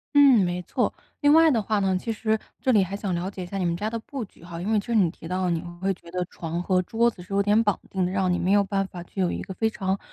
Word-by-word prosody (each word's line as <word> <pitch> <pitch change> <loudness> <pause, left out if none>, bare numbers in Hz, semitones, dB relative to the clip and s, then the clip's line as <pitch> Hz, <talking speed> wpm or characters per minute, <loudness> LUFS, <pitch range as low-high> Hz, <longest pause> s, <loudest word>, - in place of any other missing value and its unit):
嗯， 270 -8 +7
没 175 0 -1
错。 - - 0 0.3
另 290 0 +5
外 325 0 +7
的 230 -5 +2
话 215 +1 0
呢， 190 -1 +1
其 225 +5 -3
实 220 0 0 0.2
这 260 - +2
里 210 -5 +5
还 190 +2 -4
想 200 -2 -3
了 175 +2 -2
解 190 -2 -7
一 - - -6
下 195 +3 -5
你 185 - 0
们 170 0 0
家 210 +4 -2
的 230 0 -3
布 260 +1 -6
局 190 - -21
哈， 170 -1 -7
因 195 +5 -2
为 215 - +4
就 200 - -8
是 235 - 0
你 200 -5 +5
提 165 - -11
到 185 +2 -1
的 180 - +1
你 165 -1 0 0.2
会 195 0 +1
觉 170 - -15
得 180 +1 -2
床 170 0 -5
和 185 0 +2
桌 230 +6 +1
子 185 - -13
是 180 +2 -14
有 200 0 +3
点 210 +2 +4
绑 205 -3 +1
定 190 -1 0
的， 180 - -2
让 190 -2 +1
你 180 - +1
没 185 - +1
有 205 0 +5
办 195 -1 -1
法 175 -2 -8
具 190 +2 -5
有 180 - +1
一 - - -3
个 190 - -7
非 220 +4 +1
常 195 -2 -2
195 Hz, 350 characters per minute, -25 LUFS, 180-220 Hz, 0.3 s, 嗯